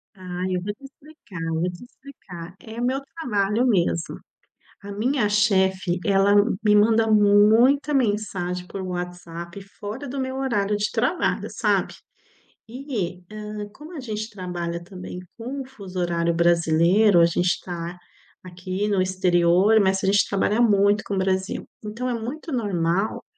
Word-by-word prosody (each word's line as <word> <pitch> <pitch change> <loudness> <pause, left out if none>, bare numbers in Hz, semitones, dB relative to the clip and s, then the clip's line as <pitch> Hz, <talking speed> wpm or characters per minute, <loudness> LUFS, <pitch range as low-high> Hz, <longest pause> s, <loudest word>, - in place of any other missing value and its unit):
Ah, 180 -1 -6
eu 180 -1 0
vou 205 - -3
te 275 - -20
explicar. 275 - -12
Vou 170 +3 0
te 180 +7 -11
explicar. 185 -11 -12
É 225 +1 -8
o - - 0
meu 260 +2 0
trabalho 220 -5 0
mesmo. 170 -6 0 0.6
A 200 0 -7
minha 225 +1 0
chefe, 190 -3 +2
ela 200 0 +4 0.3
me 210 -1 +4
manda 225 +1 +4
muita 220 +8 +5
mensagem 200 -7 -1
por 195 - -6
WhatsApp 175 0 -6 0.2
fora 225 +7 -6
do 270 +1 -4
meu 260 0 -3
horário 210 -6 0
de 205 0 -1
trabalho, 255 +10 0
sabe? - - 0 0.7
E, 225 -8 -4
hã, 210 -1 -6
como 310 +8 -11
a - - -5
gente 215 -3 -4
trabalha 175 -4 -5
também 180 0 -8 0.2
com 260 +5 -5
o - - -10
fuso 195 -8 -9
horário 170 -1 0
brasileiro, 170 +3 +4
a 170 - +7
gente 175 +1 0
tá 175 -1 -6 0.5
aqui 185 +3 -4
no 200 -2 +1
exterior, 185 +2 +3
mas 190 0 +2
a - - +2
gente 200 +1 +3
trabalha 205 +3 +1
muito 205 -2 +4
com 200 - -3
o - - 0
Brasil. 190 +1 -1 0.2
Então 230 +4 -4
é 245 - -1
muito 260 +7 -5
normal, 195 -4 -1
200 Hz, 155 wpm, -23 LUFS, 180-225 Hz, 0.7 s, a